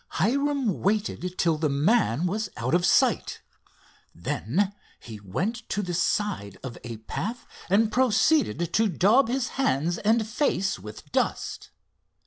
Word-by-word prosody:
Hiram 275 - +1
waited 195 -3 -1
till 165 -2 +2
the 155 -1 +1
man 155 - +2
was 205 +3 -1
out 120 +4 -2
of 175 0 +3
sight. - - +2 0.8
Then 190 - -1 0.3
he 110 -3 -10
went 175 - -2
to 205 - -1
the 180 -2 -4
side 180 - -1
of 125 -3 -6
a 115 -2 -6
path 210 - -5 0.2
and 215 +3 +3
proceeded 250 - +2
to 225 +1 +3
daub 210 - +4
his 255 +1 -1
hands 165 - +1
and 220 +1 +2
face 215 - 0
with 105 +3 -11
dust. - - -2
195 Hz, 135 wpm, -26 LUFS, 155-225 Hz, 0.8 s, daub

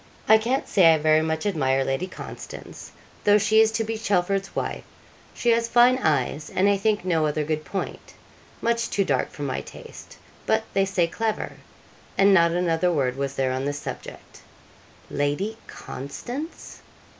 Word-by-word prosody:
I 220 0 +7
can't 250 +5 -1
say 165 -5 +6
I - - 0
very 155 +1 +3
much 160 +1 -2
admire 135 -9 +1
Lady 135 +7 -2
Constance, - - -9 0.3
though 205 0 +6
she 215 +2 +4
is 220 0 +4
to 225 - 0
be 220 0 -4
Chelford's 195 -2 0
wife. - - -3 0.5
She 240 - +2
has 230 0 +2
fine 245 +2 +5
eyes 150 - 0
and 190 +2 +2
I 200 - +4
think 210 0 0
no 165 -4 +2
other 150 0 -1
good 155 0 -2
point 195 - -6 0.5
much 235 0 +1
too 200 - +1
dark 135 -5 0
for 145 - -8
my 135 -2 -2
taste - - -12 0.3
but 220 0 +2
they 195 0 +3
say 190 -3 +1
clever;' 220 +5 -3 0.6
and 195 0 +5
not 170 -2 +5
another 175 0 +1
word 130 -6 0
was 140 0 -3
there 130 -1 0
on 130 +1 -2
this 145 0 -2
subject. - - -9 0.7
'Lady 145 +10 -1
Constance! 245 - -7
180 Hz, 165 wpm, -24 LUFS, 150-220 Hz, 0.7 s, I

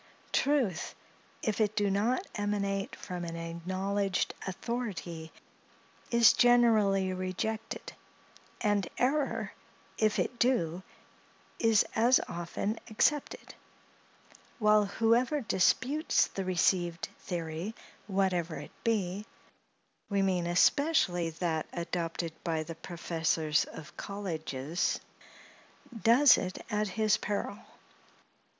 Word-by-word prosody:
Truth, 260 - +1 0.5
if 215 -1 0
it 215 0 +1
do 205 -1 +1
not 230 - +1
emanate 200 -1 -2
from 180 -1 -6
an 165 -1 -5
acknowledged 185 +4 -2
authority, 190 -6 -4 0.8
is 235 -2 +6
generally 215 -6 +4
rejected; 185 +5 -4 0.7
and 205 -4 +1
error, 275 +3 0 0.5
if 215 -1 +2
it 240 - -1
do, 180 -9 +1 0.8
is 225 -2 +4
as 240 +3 +5
often 175 +5 -3
accepted; 285 +6 0 1.0
while, 210 -2 +4
whoever 235 +7 +2
disputes 255 - +2
the 195 - -5
received 175 -2 +1
theory, 170 +4 -4 0.3
whatever 185 -4 0
it - - -8
be—we 200 -1 -4
mean 180 -3 +1
especially 180 - +3
that 160 -1 -2
adopted 170 -1 -3
by 160 -2 -1
the 165 +2 -7
professors 165 -2 0
of 155 -1 -11
colleges—does 165 -6 -3 1.5
it 185 0 -4
at 210 0 +1
his 215 +2 +2
peril. 205 0 -3
195 Hz, 90 wpm, -30 LUFS, 170-220 Hz, 1.5 s, is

